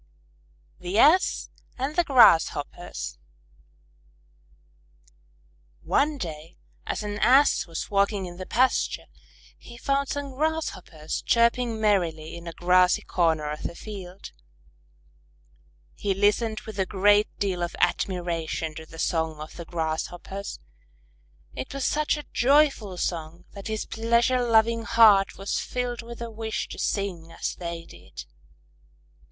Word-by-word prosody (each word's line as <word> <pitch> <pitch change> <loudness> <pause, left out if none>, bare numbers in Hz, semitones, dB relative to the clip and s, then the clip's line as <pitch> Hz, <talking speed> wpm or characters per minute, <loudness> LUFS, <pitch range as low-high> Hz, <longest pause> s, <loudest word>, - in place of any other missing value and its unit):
_ - - -25
THE 180 +3 -2
ASS 320 +10 +4 0.3
AND 270 +4 -3
THE 350 - +4
GRASSHOPPERS 165 - +3 2.6
One 295 +1 +1
day 165 - -7 0.3
as - - -2
an 205 0 -4
Ass 270 0 +4
was 165 +3 -5
walking 200 -1 +1
in 175 -1 -9
the 185 - -7
pasture, 255 +3 +1 0.5
he 235 - -12
found 275 +2 0
some 285 -1 -4
Grasshoppers 275 - -3
chirping 235 -1 +2
merrily 170 -7 0
in 170 0 -10
a - - -4
grassy 180 +2 +3
corner 160 -4 0
of 150 - -6
the 170 - -5
field. 195 -3 -9 1.6
He 200 -2 -2
listened 215 +3 +1
with 215 -2 -9
a 190 - +1
great 205 +2 +3
deal 190 -3 -1
of 175 - -3
admiration 170 -3 -1
to 160 +1 -10
the 165 - -13
song 160 -2 -1
of 155 +1 -9
the 170 - -8
Grasshoppers. 175 - -4 0.9
It 130 - -6
was 275 - -2
such 305 0 +1
a 295 - -7
joyful 270 -8 +3
song 165 -1 -4
that 200 0 -9
his 220 -1 -3
pleasure 235 +3 +1
loving 230 0 +3
heart 220 -4 +5
was 195 +1 -2
filled 245 -1 -3
with 235 0 -8
a 230 - -6
wish 220 0 -4
to - - -8
sing 180 -5 -2
as - - -3
they 170 -1 -6
did. 85 -5 -12
200 Hz, 130 wpm, -26 LUFS, 170-235 Hz, 2.6 s, heart